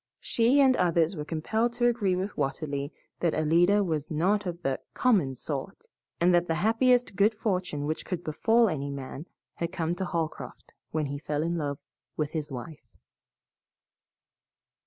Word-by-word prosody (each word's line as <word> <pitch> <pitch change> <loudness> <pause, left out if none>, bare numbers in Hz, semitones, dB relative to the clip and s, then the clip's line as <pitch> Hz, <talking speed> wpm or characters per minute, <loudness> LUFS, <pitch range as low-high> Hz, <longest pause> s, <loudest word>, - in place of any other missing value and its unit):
She 240 +5 +3
and 265 -2 +5
others 170 0 +2
were 150 - -4
compelled 220 +10 -1
to 240 0 0
agree 225 -6 +2
with 190 +3 -3
Watterly 140 +1 -2 0.3
that 170 -2 +1
Alida 175 +6 +4
was 155 -5 -2
not 190 +6 +1
of 170 -1 -4
the 135 -1 0 0.2
"common 190 - +2
sort," 145 +8 -5 0.3
and 175 +1 +4
that 175 0 +3
the 165 - 0
happiest 235 +4 +3
good 210 +2 +3
fortune 180 -9 -2
which 155 +1 -2
could 175 -2 -4
befall 225 +9 +3
any 140 -6 -2
man 140 +3 -7 0.3
had 170 - -3
come 165 -1 -1
to 185 +2 -3
Holcroft 165 -3 -4 0.2
when 155 -1 -1
he 140 0 -4
fell 150 0 -2
in 170 +1 -1
love 145 -4 -2 0.4
with 150 -2 -1
his 155 -3 -4
wife. 135 +5 -9
170 Hz, 160 wpm, -28 LUFS, 150-205 Hz, 0.4 s, and